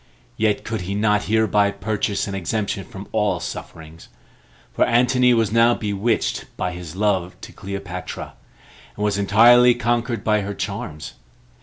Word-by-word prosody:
Yet 105 -2 0
could 110 -3 -4
he 95 +3 -4
not 105 0 +1
hereby 105 -2 +2
purchase 105 0 -2
an 100 - -5
exemption 95 +1 -2
from 95 +1 -10
all 105 -2 0
sufferings; 80 0 -9 0.7
for - - +2
Antony 125 +1 +3
was 115 -3 +2
now 115 +1 +4
bewitched 105 +2 -1
by 90 - -2
his 90 -2 -8
love 95 -3 -1
to - - -10
Cleopatra, 95 -3 -7 0.6
and 105 - -4
was 100 -1 0
entirely 120 +5 +6
conquered 120 0 -1
by 105 -1 +2
her 100 0 -5
charms. 95 -7 -5
105 Hz, 145 wpm, -21 LUFS, 95-115 Hz, 0.7 s, entirely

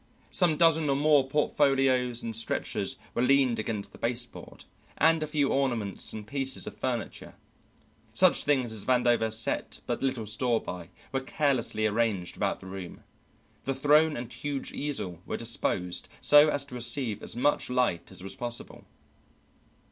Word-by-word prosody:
Some 170 -5 +3
dozen 160 -2 +4
or 135 - +2
more 145 -1 +3
portfolios 135 -4 +1
and 115 -1 -1
stretchers 115 - 0 0.2
were - - -1
leaned 130 -2 +3
against 105 -2 -3
the - - -15
baseboard, 120 +1 -4 0.3
and 160 +1 +4
a 155 - -2
few 145 -2 +1
ornaments 120 -8 -1
and 110 -1 -7
pieces 135 +4 -2
of - - -8
furniture, 120 -4 -4 0.8
such - - +4
things 130 -5 +1
as 110 -3 +1
Vandover 120 -3 +2
set 110 0 -3
but - - -3
little 130 -4 -1
store 115 +2 0
by, 90 -5 -8 0.2
were 135 - 0
carelessly 130 -6 0
arranged 105 -4 -1
about - - -2
the - - -12
room. 95 -2 -8 0.6
The 135 - -1
throne 150 +3 +3
and 120 0 -7
huge 145 -2 -4
easel 95 - -4
were - - -3
disposed 95 -6 0
so 150 +1 +6
as 145 -2 +2
to 140 - -12
receive 120 -3 -1
as - - -2
much 135 +3 +1
light 125 -9 0
as - - -6
was 95 0 -5
possible. 120 +1 -4
125 Hz, 155 wpm, -28 LUFS, 110-140 Hz, 0.8 s, so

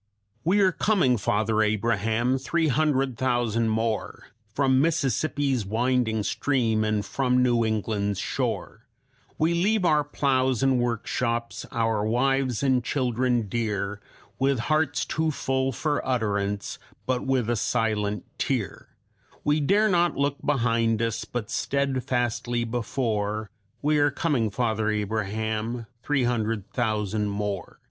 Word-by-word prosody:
"We 190 +6 +3
are 190 -1 +5
coming, 180 - +2
Father 110 +1 +1
Abraham 110 +3 +1
three 160 +4 0
hundred 135 -3 +1
thousand 120 -3 +1
more, 110 0 -2 0.2
From 130 +2 +3
Mississippi's 140 -4 +1
winding 110 +1 0
stream 115 -4 +1
and 105 -1 0
from 125 -2 +1
New 120 -2 +3
England's 105 -2 -1
shore. - - -3 0.5
We 160 +2 +2
leave 195 +3 +2
our 150 -3 +4
plows 130 -3 +1
and 135 -2 +3
workshops, 115 0 -2
our 115 -2 0
wives 130 +2 +1
and 130 -2 +2
children 125 -3 0
dear, 105 -2 -2 0.4
With 135 0 +2
hearts 155 -2 +1
too 160 +1 0
full 135 -2 0
for 145 +3 -1
utterance, 105 -5 -1 0.3
with 130 -1 0 0.2
but 120 - 0
a - - 0
silent 105 -2 -1
tear; - - -2 0.5
We 150 +1 +2
dare 200 +9 +3
not 175 -3 +2
look 140 0 0
behind 115 -5 +1
us, 115 -1 -2
but 120 -4 -5
steadfastly 120 -3 -1
before 110 -3 -2 0.3
We 150 +1 +3
are 145 0 +4
coming, 135 -6 0
Father 110 -1 0
Abraham 110 +2 -2 0.2
three 145 0 +1
hundred 110 -4 -1
thousand 110 -3 0
more. 100 -2 -4
120 Hz, 125 wpm, -26 LUFS, 110-135 Hz, 0.5 s, are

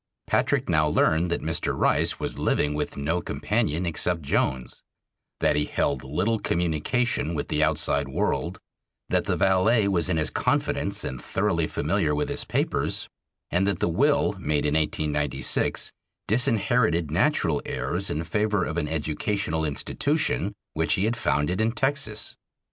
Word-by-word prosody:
Patrick - - +1
now 75 0 +3
learned 80 +3 +2
that 85 - -2
Mr. 80 +1 0
Rice - - +2
was - - -3
living 75 0 +1
with 75 - -3
no 80 +5 -1
companion 85 +1 -1
except 85 0 -1
Jones; 65 -2 -1 0.6
that - - +3
he 75 0 +1
held 70 -3 -1
little 90 +12 0
communication 85 - 0
with 75 - -3
the 75 - +1
outside - - +1
world; - - -1 0.5
that - - +1
the - - 0
valet 100 +3 +3
was 90 -3 +1
in 85 - +1
his 75 -1 0
confidence - - 0
and 65 -1 -5
thoroughly 85 -3 0
familiar 75 -1 0
with 75 - -1
his - - -2
papers, - - -1 0.4
and 95 +3 +2
that 100 -4 0
the - - +1
will 130 - +2
made 75 -4 0
in 75 - +1
1896 75 -2 0 0.4
disinherited 110 -7 +2
natural 85 - +2
heirs 95 +4 -2
in 75 +3 -2
favor 105 +3 0
of 80 +2 -4
an 80 -3 0
educational 80 +2 -1
institution 75 -3 0 0.2
which 80 -1 +1
he 95 - +1
had 115 +2 0
founded 90 -2 0
in 110 +1 +2
Texas. 120 -3 -1
85 Hz, 150 wpm, -25 LUFS, 75-100 Hz, 0.6 s, now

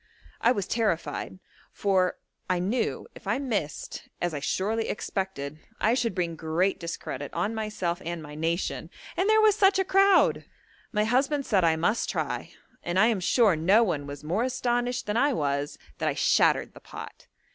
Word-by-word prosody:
I 235 - +5
was 200 -6 -1
terrified; 205 -5 -1 0.3
for 190 -2 +1 0.3
I 185 - +2
knew 210 +7 -1
if - - -13
I 210 +4 +1
missed, 215 - -4
as 175 -2 -1
I 145 - -2
surely 215 +9 -1
expected, 155 -9 -4 0.2
I 220 +3 +3
should 240 -2 0
bring 170 -3 -1
great 165 +4 0
discredit 145 -4 -5
on 190 +6 0
myself 210 -5 -2
and 170 +1 -4
my 150 0 -9
nation, 165 +3 -2 0.3
and 385 +3 +1
there 435 0 +6
was 430 -2 +5
such 390 -2 +4
a 385 - +2
crowd! 390 0 +4 0.5
My 210 -1 +1
husband 270 +5 +1
said 195 -5 +2
I 165 -1 +4
must 190 +8 0
try, 155 - -3 0.3
and 175 +1 -2
I 220 +4 +6
am 220 -4 +1
sure 205 +1 +4
no 190 +9 +4
one 150 -9 -2
was 145 +1 -8
more 175 +8 0
astonished 245 -1 -1
than 210 +2 -1
I 285 +3 +3
was 145 - -1 0.2
that - - +1
I - - -2
shattered - - +3
the - - -12
pot. - - -10
195 Hz, 180 wpm, -27 LUFS, 165-240 Hz, 0.5 s, there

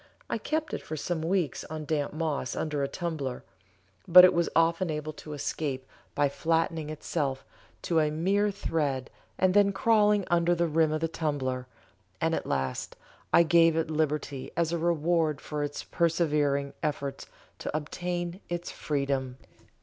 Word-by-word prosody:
I 230 - 0
kept 310 +6 -2
it - - -2
for 155 - -6
some 160 +2 -2
weeks 170 -4 0
on 155 -1 -6
damp 145 -1 -1
moss 155 -5 -2
under 150 -2 -2
a 140 - +1
tumbler, 145 -5 -4 0.6
but 180 +1 +10
it 185 - +5
was 170 0 +1
often 165 +2 +3
able 155 0 -3
to 150 0 -9
escape 140 -2 -3 0.3
by 145 0 +3
flattening 160 +2 0
itself 145 -3 -3 0.4
to 165 -2 +2
a 155 -1 +2
mere 195 +7 +1
thread 150 -9 -2 0.3
and 185 -1 +3
then 200 0 +5
crawling 210 -2 +3
under 175 0 +3
the 170 0 +1
rim 160 -1 +2
of 155 0 -1
the 165 - +1
tumbler, 130 -6 -2 0.5
and - - +1
at - - -2
last 65 -1 -2 0.4
I 170 - +7
gave 165 0 +5
it 160 -1 0
liberty 150 -3 -1
as 170 -1 +1
a 170 - -1
reward 165 -2 +1
for 150 -1 -4
its 145 0 -4
persevering 150 -4 +1
efforts 140 -2 -3 0.3
to 155 - -2
obtain 175 +3 -4
its 175 0 -3
freedom. 135 -3 -2
160 Hz, 160 wpm, -28 LUFS, 145-170 Hz, 0.6 s, but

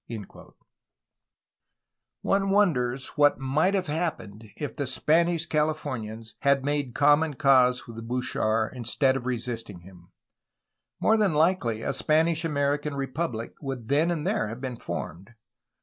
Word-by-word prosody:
[ - - -58 2.2
One 195 0 +1
wonders 135 -11 +1
what 145 -1 +3
might 150 +9 +1
have 190 -2 0
happened 145 - -4
if 145 -3 -5
the 140 - -2
Spanish 165 +5 +2
Califomians 130 -9 -2
had 140 -1 +2
made 145 -4 -1
common 145 +1 +3
cause 130 -3 +4
with 115 -1 -9
Bouchard 115 -3 -1
in 125 - -6
stead 130 +3 +2
of 130 -1 -4
resisting 115 -6 -4
him. 90 -1 -16 0.9
More 220 - +3
than 200 -7 +2
likely 150 -9 +1
a 135 - -1
Spanish 160 +3 +2
American 145 -1 0
repubUc 135 -3 -3
would 135 -5 -6
then 150 +5 +3
and 165 -4 -2
there 105 - 0
have 115 +3 -7
been 125 -2 -5
formed. 95 +6 -7
135 Hz, 135 wpm, -26 LUFS, 120-155 Hz, 2.2 s, cause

